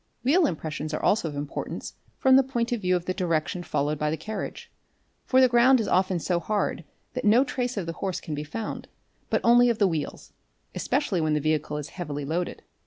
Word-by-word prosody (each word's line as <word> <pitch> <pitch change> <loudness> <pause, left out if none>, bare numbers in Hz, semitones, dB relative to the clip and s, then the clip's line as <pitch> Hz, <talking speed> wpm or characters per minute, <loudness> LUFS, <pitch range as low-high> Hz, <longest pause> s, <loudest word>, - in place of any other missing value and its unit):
Wheel 310 +6 +4
impressions 155 -1 -4
are - - -5
also 205 -5 +2
of 145 - -8
importance 145 0 -5 0.2
from 265 0 +5
the 270 - +8
point 245 -3 -2
of 240 -3 -1
view 180 -1 +2
of 175 -1 -2
the 185 - -1
direction 175 -1 -1
followed 150 -3 -1
by 150 - 0
the 160 - -1
carriage, 215 +5 -6 0.5
for 260 - +4
the 260 - +7
ground 245 +2 +5
is 220 - -1
often 185 0 +2
so 170 +1 0
hard 200 -1 -1 0.3
that 255 - -3
no 230 +4 +5
trace 250 -3 -3
of 195 - -2
the 165 - -4
horse 185 +1 -3
can 155 - -6
be 150 0 -3
found 210 +9 -5 0.4
but - - +1
only 240 +1 +6
of 235 - +1
the 205 - +4
wheels, 160 -4 -4 0.4
especially 190 - 0
when 155 -1 +1
the - - +2
vehicle 150 0 -1
is 150 - -6
heavily 145 -5 -5
loaded. 170 +4 -3
180 Hz, 215 wpm, -26 LUFS, 155-235 Hz, 0.5 s, the